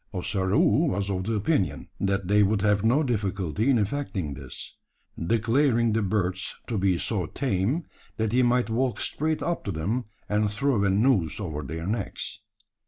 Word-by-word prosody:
Ossaroo 95 +1 +2
was 100 +2 -1
of 95 -1 -2
the 115 - -1
opinion, 105 - 0
that 95 -1 0
they 105 +2 +4
would 100 0 +2
have 105 -1 +3
no 125 +7 +3
difficulty 105 - -1
in 130 - +5
effecting 105 - -2
this; - - -8 0.5
declaring 115 - +2
the 110 - +2
birds 95 -1 -1
to 110 -4 -2
be 95 -2 +2
so 95 -3 -1
tame, 130 - 0 0.3
that 110 -1 0
he 125 +2 +3
might 120 -1 +2
walk 125 +2 0
straight 155 +1 -1
up 170 0 -1
to 100 - -3
them, 100 +10 -2 0.2
and 105 0 +1
throw 115 0 +1
a 100 - +3
noose 100 - +2
over 80 -7 -4
their 80 +4 -5
necks. 105 0 -3
105 Hz, 170 wpm, -26 LUFS, 95-120 Hz, 0.5 s, in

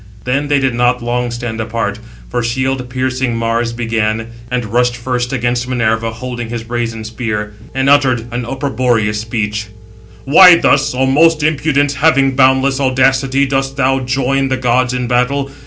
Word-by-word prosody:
Then 140 +3 -1
they 145 0 +2
did 135 -3 0
not 125 0 +1
long 120 +1 -1
stand 120 -1 -5
apart; 110 -2 -3 0.3
for 120 - -2
shield 130 +2 -2
piercing 130 -1 -2
Mars 115 +1 -1
began, 115 -1 -2 0.2
and 125 -1 -2
rushed 125 0 +1
first 125 0 -3
against 120 -1 -1
Minerva, 115 -2 0
holding 120 0 -6
his 115 -1 -5
brazen 115 -1 -4
spear, 110 -1 -4 0.2
and 135 0 0
uttered 135 -5 +3
an 120 0 -2
opprobrious 120 -5 -1
speech: 105 -2 -3 0.6
"Why 175 +6 +8
thus, 145 -4 +2
O 130 +1 +1
most 155 +3 +3
impudent, 145 -2 +1
having 140 -2 +2
boundless 130 0 +3
audacity, 135 +1 +2
dost 135 0 -2
thou 135 0 +2
join 135 +1 0
the 130 0 -1
gods 125 0 +1
in 125 0 -2
battle? 130 +3 0
125 Hz, 155 wpm, -15 LUFS, 115-135 Hz, 0.6 s, Why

